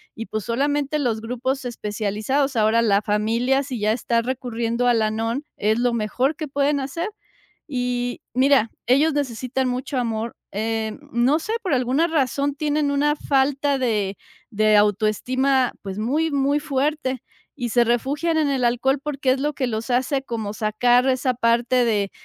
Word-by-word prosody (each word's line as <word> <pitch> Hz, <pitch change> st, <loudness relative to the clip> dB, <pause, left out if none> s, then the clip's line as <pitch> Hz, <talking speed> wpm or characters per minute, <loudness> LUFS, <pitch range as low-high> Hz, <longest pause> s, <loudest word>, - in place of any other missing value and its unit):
y, 225 Hz, -, -6 dB
pues, 215 Hz, -2 st, -3 dB
solamente 285 Hz, +4 st, 0 dB
los 230 Hz, -5 st, -1 dB
grupos 255 Hz, +3 st, -3 dB
especializados, 220 Hz, +4 st, -1 dB
ahora 220 Hz, +1 st, +3 dB
la 205 Hz, -2 st, +3 dB
familia, 230 Hz, +6 st, +1 dB
si 255 Hz, -4 st, -5 dB
ya 210 Hz, +1 st, +2 dB
está 235 Hz, 0 st, 0 dB
recurriendo 240 Hz, -1 st, -2 dB
a 245 Hz, -, +5 dB
Al-Anon, 225 Hz, +4 st, 0 dB
es 215 Hz, +3 st, +1 dB
lo 245 Hz, 0 st, +2 dB
mejor 250 Hz, +6 st, 0 dB
que 310 Hz, -2 st, -5 dB
pueden 280 Hz, +1 st, +1 dB
hacer, 335 Hz, +9 st, -3 dB, 0.6 s
y 245 Hz, -2 st, -2 dB
mira, 260 Hz, -3 st, +3 dB, 0.2 s
ellos 290 Hz, +5 st, +4 dB
necesitan 260 Hz, -1 st, -2 dB
mucho 255 Hz, +2 st, -3 dB
amor, 225 Hz, -1 st, -2 dB, 0.2 s
eh, 220 Hz, +2 st, -2 dB
no 245 Hz, +6 st, +3 dB
sé, 425 Hz, +7 st, -4 dB
por 370 Hz, -9 st, -1 dB
alguna 260 Hz, +6 st, +1 dB
razón 280 Hz, -2 st, 0 dB
tienen 295 Hz, 0 st, 0 dB
una 290 Hz, +1 st, +2 dB
falta 280 Hz, 0 st, +1 dB
de 210 Hz, -6 st, -1 dB, 0.3 s
de 215 Hz, -1 st, +3 dB
autoestima, 245 Hz, +6 st, +2 dB
pues, 195 Hz, +1 st, -5 dB
muy 300 Hz, +8 st, 0 dB
muy 280 Hz, +1 st, +1 dB
fuerte 275 Hz, -2 st, -1 dB, 0.3 s
y 245 Hz, -4 st, -3 dB
se 240 Hz, +1 st, +4 dB
refugian 280 Hz, +8 st, 0 dB
en 300 Hz, -2 st, +2 dB
el 265 Hz, -2 st, 0 dB
alcohol 265 Hz, +3 st, +1 dB
porque 275 Hz, -3 st, 0 dB
es 260 Hz, -, +1 dB
lo 295 Hz, +2 st, -1 dB
que 260 Hz, -3 st, -1 dB
los 225 Hz, +1 st, -4 dB
hace 265 Hz, +2 st, +1 dB
como 220 Hz, -5 st, -4 dB
sacar 240 Hz, +4 st, +2 dB
esa 255 Hz, 0 st, +1 dB
parte 240 Hz, +1 st, +2 dB
de 205 Hz, -3 st, 0 dB
250 Hz, 160 wpm, -22 LUFS, 225-280 Hz, 0.6 s, a